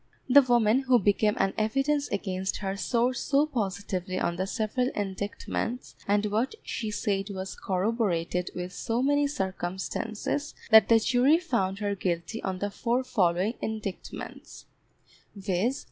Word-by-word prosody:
The 275 +2 +8
woman 240 -2 +3
who 255 -1 +6
became 210 0 +2
an 195 0 +1
evidence 275 +7 +1
against 190 -1 -2
her 195 -1 -3
swore 235 +6 +1
so 280 +3 +2
positively 200 - -3
on 170 - 0
the 190 +2 -2
several 225 +5 0
indictments, 205 +5 -3
and 205 +1 +2
what 220 - 0
she 220 -3 -3
said 200 -1 -1
was 190 -1 -5
corroborated 185 -3 -1
with 180 +1 -5
so 230 +6 -1
many 285 +1 +3
circumstances, 195 +5 -3 0.2
that 220 0 +8
the 230 - +7
jury 255 +7 +4
found 235 - -1
her 205 -1 -1
guilty 180 +2 -2
on 190 -1 -2
the 205 +2 -3
four 240 +5 0
following 190 -3 +1
indictments, 215 -3 -6 0.7
viz. 200 +6 0
210 Hz, 140 wpm, -28 LUFS, 190-245 Hz, 0.7 s, The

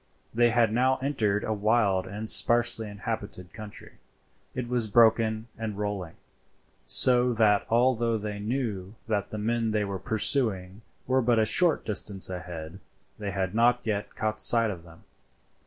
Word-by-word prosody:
They 120 +1 +3
had 115 -2 +2
now 130 +2 +2
entered 110 -8 0
a 110 - -2
wild 105 -3 +1
and 105 +3 -7
sparsely 115 -1 +3
inhabited 100 -4 -7
country. 105 -2 -11 0.6
It 125 -2 -4
was 120 -2 -1
broken 110 0 +3
and 110 -3 -5
rolling, 100 -5 -4 0.7
so 125 - +6
that 105 -3 +2
although 120 -1 +1
they 105 -1 -6
knew 105 -4 -4
that 105 -3 -2
the 110 - -6
men 115 +2 -1
they 105 -1 -1
were 100 -1 -5
pursuing 105 -2 -1 0.2
were 130 +1 +1
but 120 -1 +1
a 110 - +3
short 165 +8 +2
distance 100 -2 -3
ahead 90 -1 -8 0.4
they 105 -1 -4
had 95 -1 -3
not 120 +2 +2
yet 105 -2 -3
caught 110 0 -3
sight 115 -2 +3
of 85 -4 -9
them. 80 -1 -17
110 Hz, 155 wpm, -26 LUFS, 100-120 Hz, 0.7 s, so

